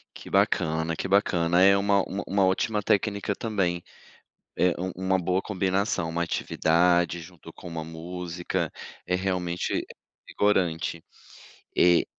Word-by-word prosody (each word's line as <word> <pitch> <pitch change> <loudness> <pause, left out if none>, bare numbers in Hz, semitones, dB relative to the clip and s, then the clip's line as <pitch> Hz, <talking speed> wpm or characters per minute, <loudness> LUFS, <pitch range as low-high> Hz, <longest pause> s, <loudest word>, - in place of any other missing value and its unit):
Que - - -10
bacana, 80 +1 +1
que 95 - -3
bacana. 90 -3 +3
É 100 +1 +7
uma 100 0 +3
uma 100 - -4
uma 100 -1 +2
ótima 105 +3 +1
técnica 100 0 0
também, 95 -6 -1 0.7
eh, 90 0 +3
um 95 +1 -2
um 95 0 -5
uma 95 0 +3
boa 90 +1 0
combinação. 95 -2 0
Uma 85 +1 -1
atividade 85 +1 +2
junto 85 -1 -12
com - - -13
uma 80 -2 -5
música, 85 +2 -4 0.4
é 90 - 0
realmente 90 -2 -1 0.4
revigorante. 85 -5 0 0.7
E 85 -1 +5
90 Hz, 135 wpm, -26 LUFS, 85-95 Hz, 0.7 s, É